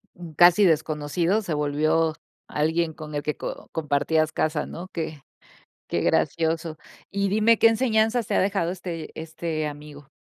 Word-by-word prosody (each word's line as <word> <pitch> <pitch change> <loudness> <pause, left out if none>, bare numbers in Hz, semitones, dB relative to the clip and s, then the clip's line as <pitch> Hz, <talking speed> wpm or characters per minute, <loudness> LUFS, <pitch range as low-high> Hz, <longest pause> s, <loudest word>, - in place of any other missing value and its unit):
Un 170 -2 -10
casi 175 +5 +6
desconocido 160 +4 +1
se 180 -6 -3
volvió 155 +2 +1 0.3
alguien 160 +2 0
con 155 0 -9
el 145 0 -2
que 150 - -2
co - - -7
compartías 155 +1 +1
casa, 155 -1 -1
¿no? 175 +2 -8
Qué 155 -4 -5 0.7
qué - - -1
gracioso. 160 -1 0 0.3
Y 200 0 0
dime, 215 +3 +4
¿qué 230 - +7
enseñanzas 225 0 +1
te - - -2
ha - - +3
dejado 190 -3 0
este 175 -3 -6
este 160 -1 -3
amigo? 145 -1 -9
160 Hz, 155 wpm, -25 LUFS, 155-185 Hz, 0.7 s, qué